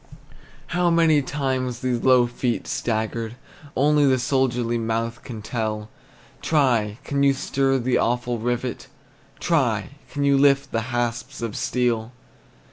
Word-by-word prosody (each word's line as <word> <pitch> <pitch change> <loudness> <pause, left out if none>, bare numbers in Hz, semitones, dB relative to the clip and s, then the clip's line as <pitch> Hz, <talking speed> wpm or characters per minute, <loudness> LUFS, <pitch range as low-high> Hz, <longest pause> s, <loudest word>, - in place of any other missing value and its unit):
How 175 0 +2
many 165 -3 +4
times 130 -3 -2
these 125 -2 -1
low 130 -2 +5
feet 120 0 -2
staggered, 110 0 -2 0.4
Only 145 +1 +4
the 130 -1 +4
soldered 125 -1 +1
mouth 115 +1 -2
can 110 -4 -8
tell; 110 -1 -3 0.5
Try! 120 -9 +2
can 140 -1 -1
you 140 0 +5
stir 135 0 +1
the 130 0 +1
awful 120 0 0
rivet? 120 +2 -3 0.5
Try! 125 -11 +1 0.2
can 145 - -3
you 140 -1 +4
lift 140 -1 +3
the 115 +2 -2
hasps 120 -1 -2
of 115 -3 -3
steel? 120 -2 0
125 Hz, 130 wpm, -23 LUFS, 115-135 Hz, 0.5 s, low